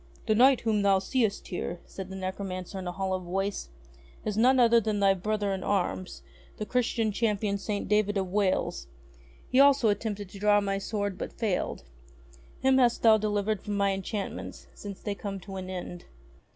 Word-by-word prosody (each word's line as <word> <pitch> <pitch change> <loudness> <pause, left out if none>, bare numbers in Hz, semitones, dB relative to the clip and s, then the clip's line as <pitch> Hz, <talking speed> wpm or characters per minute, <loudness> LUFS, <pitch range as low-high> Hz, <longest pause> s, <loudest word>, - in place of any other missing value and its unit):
"The 220 - +3
Knight 255 +3 +5
whom 220 -3 +1
thou 200 -1 +4
seest 220 +2 -1
here," 175 -1 -4
said 190 -1 -8
the 190 - -7
necro 190 +1 -4
mancer 185 0 -5
in 185 - -6
a - - -2
hollow 190 0 -2
voice, 190 - -3 0.6
"is 210 - -1
none 255 +4 +4
other 235 -1 +6
than 210 -1 -1
thy 195 -1 +5
brother 205 +1 -1
in 190 - -4
arms, 185 -2 -2 0.3
the 215 - -3
Christian 230 -2 0
Champion 205 -2 0
St. 205 0 -3
David 210 -1 +2
of 190 -2 -2
Wales. 200 -2 0 0.6
He 255 - +3
also 280 -4 +6
attempted 205 -1 -2
to 195 - -11
draw 205 0 +4
my 195 -1 -1
sword 200 -2 -3
but - - -4
failed. 215 -6 -2 0.8
Him 265 0 +4
hast 240 -2 +3
thou 220 -1 +7
delivered 210 -1 -1
from 205 -1 -3
my 200 -1 +2
enchantments 195 +2 -5
since 200 -2 -8
they 205 - -3
come 200 -1 -5
to 195 0 -9
an 185 0 -6
end." 180 -1 -6
205 Hz, 185 wpm, -28 LUFS, 195-215 Hz, 0.8 s, thou